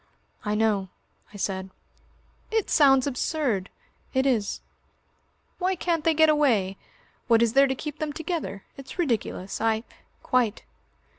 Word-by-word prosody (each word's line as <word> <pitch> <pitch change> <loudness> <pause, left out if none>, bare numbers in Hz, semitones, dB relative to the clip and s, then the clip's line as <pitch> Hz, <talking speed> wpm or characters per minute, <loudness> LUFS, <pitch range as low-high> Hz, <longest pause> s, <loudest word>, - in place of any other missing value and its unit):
"I 210 0 -1
know," 210 -3 +1 0.4
I 205 - -10
said. 190 -1 -3 0.8
"It 445 -2 0
sounds 270 -3 +5
absurd." 250 - -1 0.5
"It 260 +1 +3
is." 230 -7 0 1.0
"Why 375 +1 +1
can't 335 -2 -1
they 325 0 +3
get 315 +1 +6
away? 235 -11 +2 0.5
What 230 -1 +5
is 230 -1 +1
there 275 +1 +6
to 265 - -1
keep 300 +2 -6
them 310 -1 -2
together? 320 - -4
It's 275 +5 -10
ridiculous. 230 - -2
I 220 0 +1 0.2
" - - -38
"Quite." 240 -4 +1
260 Hz, 140 wpm, -26 LUFS, 210-305 Hz, 1.0 s, get